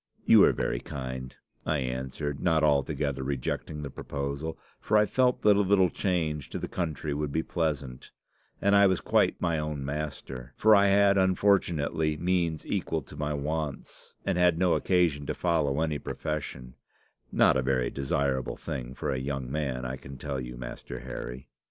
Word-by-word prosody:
"'You -, -, +8 dB
are -, -, +5 dB
very -, -, -1 dB
kind,' 65 Hz, -1 st, -6 dB, 0.3 s
I 75 Hz, -, 0 dB
answered, 65 Hz, +2 st, -3 dB
not 80 Hz, -3 st, +2 dB
altogether 70 Hz, -1 st, +1 dB
rejecting 70 Hz, +3 st, -3 dB
the 70 Hz, -, -5 dB
proposal, 70 Hz, +5 st, -4 dB, 0.2 s
for 110 Hz, -, +2 dB
I 105 Hz, -, +5 dB
felt 125 Hz, +2 st, +1 dB
that 105 Hz, -1 st, +6 dB
a -, -, +2 dB
little 95 Hz, -3 st, +4 dB
change 80 Hz, -7 st, -1 dB
to -, -, -4 dB
the -, -, -4 dB
country 80 Hz, -4 st, -3 dB
would 75 Hz, 0 st, -2 dB
be 80 Hz, +3 st, 0 dB
pleasant, 70 Hz, -7 st, -3 dB, 0.5 s
and 100 Hz, +1 st, +3 dB
I 100 Hz, 0 st, +7 dB
was 95 Hz, -2 st, +2 dB
quite -, -, +2 dB
my 85 Hz, -3 st, 0 dB
own 75 Hz, -2 st, -3 dB
master. 70 Hz, -3 st, -5 dB
For 110 Hz, 0 st, +6 dB
I 100 Hz, 0 st, +5 dB
had 100 Hz, 0 st, +5 dB
unfortunately 85 Hz, -5 st, +2 dB
means 85 Hz, -2 st, 0 dB
equal -, -, -2 dB
to -, -, -13 dB
my 75 Hz, 0 st, -2 dB
wants, 75 Hz, 0 st, -4 dB
and 90 Hz, -, 0 dB
had 90 Hz, -2 st, +4 dB
no 90 Hz, 0 st, +3 dB
occasion 85 Hz, -6 st, +1 dB
to -, -, -2 dB
follow 80 Hz, -5 st, +1 dB
any 80 Hz, -2 st, 0 dB
profession 65 Hz, -5 st, -5 dB, 0.6 s
not -, -, +4 dB
a 65 Hz, -, +2 dB
very 65 Hz, -2 st, 0 dB
desirable 70 Hz, -1 st, -1 dB
thing 65 Hz, 0 st, -5 dB
for -, -, -2 dB
a 65 Hz, -, -1 dB
young 65 Hz, -1 st, -4 dB
man, 65 Hz, -4 st, -2 dB
I 65 Hz, +1 st, -3 dB
can 70 Hz, +1 st, -10 dB
tell 70 Hz, -2 st, -4 dB
you, -, -, -7 dB
Master -, -, -7 dB
Harry. 60 Hz, +2 st, -7 dB
75 Hz, 175 wpm, -28 LUFS, 65-85 Hz, 0.6 s, You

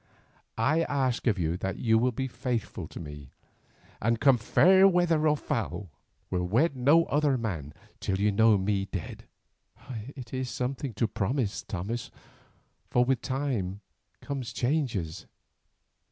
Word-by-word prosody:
I 140 Hz, +9 st, +2 dB
ask 130 Hz, -4 st, 0 dB
of 105 Hz, -3 st, +3 dB
you 85 Hz, -1 st, 0 dB
that 95 Hz, +1 st, -3 dB
you 110 Hz, -1 st, +3 dB
will 125 Hz, +2 st, +2 dB
be 130 Hz, +3 st, -3 dB
faithful 120 Hz, -3 st, -3 dB
to -, -, -9 dB
me, 75 Hz, -4 st, -9 dB, 0.7 s
and 115 Hz, +1 st, +1 dB
come 135 Hz, -2 st, +5 dB
fair 190 Hz, -, +6 dB
weather 170 Hz, -4 st, +3 dB
or 150 Hz, 0 st, +3 dB
foul, 110 Hz, -, -3 dB, 0.4 s
will 90 Hz, -1 st, 0 dB
wed 135 Hz, -, +2 dB
no 145 Hz, +7 st, +4 dB
other 145 Hz, -2 st, +2 dB
man 85 Hz, -, -4 dB, 0.3 s
till 95 Hz, 0 st, -1 dB
you 105 Hz, +1 st, +3 dB
know 110 Hz, +1 st, +5 dB
me 95 Hz, 0 st, 0 dB
dead." 95 Hz, -3 st, -6 dB, 0.9 s
"It 125 Hz, -3 st, -9 dB
is 130 Hz, -1 st, -2 dB
something 130 Hz, -1 st, -3 dB
to 115 Hz, -, +1 dB
promise, 110 Hz, +1 st, -1 dB
Thomas, 105 Hz, +6 st, -4 dB, 0.8 s
for 125 Hz, 0 st, +3 dB
with 135 Hz, +1 st, +1 dB
time 125 Hz, -8 st, -2 dB, 0.4 s
come 140 Hz, -1 st, -4 dB
changes. 120 Hz, -, -2 dB
120 Hz, 140 wpm, -28 LUFS, 100-135 Hz, 0.9 s, fair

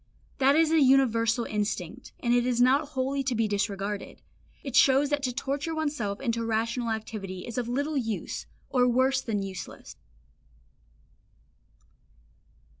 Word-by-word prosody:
That 275 Hz, +1 st, +5 dB
is 320 Hz, 0 st, +4 dB
a 325 Hz, -1 st, +4 dB
universal 235 Hz, -4 st, +3 dB
instinct, 210 Hz, +1 st, -3 dB
and 240 Hz, -1 st, +2 dB
it 245 Hz, 0 st, +3 dB
is 245 Hz, -1 st, 0 dB
not 270 Hz, +5 st, +4 dB
wholly 275 Hz, -1 st, -1 dB
to 260 Hz, -2 st, -1 dB
be 225 Hz, -1 st, +1 dB
disregarded; 200 Hz, 0 st, -3 dB, 0.4 s
it 270 Hz, -3 st, -5 dB
shows 275 Hz, +2 st, +5 dB
that 290 Hz, -1 st, +1 dB
to 255 Hz, -2 st, -1 dB
torture 280 Hz, +5 st, -3 dB
oneself 285 Hz, -11 st, -2 dB
into 230 Hz, -3 st, -1 dB
rational 230 Hz, +2 st, -1 dB
activity 210 Hz, -4 st, -5 dB
is 235 Hz, +1 st, -4 dB
of 240 Hz, -1 st, -3 dB
little 285 Hz, +4 st, -1 dB
use, 225 Hz, -5 st, -3 dB, 0.2 s
or 250 Hz, -2 st, +3 dB
worse 260 Hz, +2 st, +2 dB
than 210 Hz, -5 st, -2 dB
useless. 190 Hz, -2 st, -8 dB
245 Hz, 140 wpm, -27 LUFS, 220-270 Hz, 0.4 s, That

